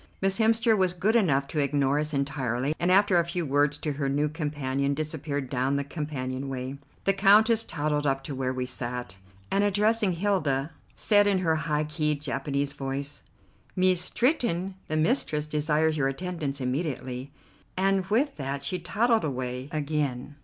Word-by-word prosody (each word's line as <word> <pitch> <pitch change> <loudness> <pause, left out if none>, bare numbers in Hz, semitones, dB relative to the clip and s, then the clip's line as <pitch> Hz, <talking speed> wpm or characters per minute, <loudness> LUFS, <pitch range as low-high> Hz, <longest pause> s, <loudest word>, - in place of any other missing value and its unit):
Miss 195 +2 0
Hemster 225 0 +4
was 185 -3 +2
good 195 +6 +1
enough 140 -11 +3
to 155 - -2
ignore 140 0 +1
us 150 0 -2
entirely, 140 -2 -1
and, 175 +1 +2
after 195 -2 +5
a - - +3
few 170 0 -3
words 145 +1 +2
to 150 0 -3
her 140 -1 -2
new 145 +2 +1
companion, 140 -3 -2
disappeared 150 -2 -3
down 130 +2 0
the 140 - 0
companion 140 -3 -4
way. 130 +1 -5 0.2
The 195 - +3
Countess 215 +4 +5
toddled 150 -3 -1
up 135 0 0
to 145 - -5
where 130 -1 -1
we 130 -1 -2
sat, 125 -5 -4 0.3
and, 200 - +3
addressing 205 0 +2
Hilda, 165 -7 0 0.2
said 205 -1 +4
in 200 -2 +3
her 165 -3 +1
high 155 -1 0
keyed 150 -1 -1
Japanese 140 0 -2
voice: 140 +1 -3 0.5
"Mees 185 -1 +3
Stretton, 195 - 0
the 155 - -1
mistress 155 - +1
desires 155 +1 +1
your 135 -2 +2
attendance 145 -1 -3
immediately," 130 -1 -3 0.5
and 195 0 +2
with 250 +8 +1
that 140 0 -4
she 180 +6 -2
toddled 220 +7 +1
away 130 -2 -3
again. 145 -3 -2
150 Hz, 165 wpm, -27 LUFS, 135-185 Hz, 0.5 s, after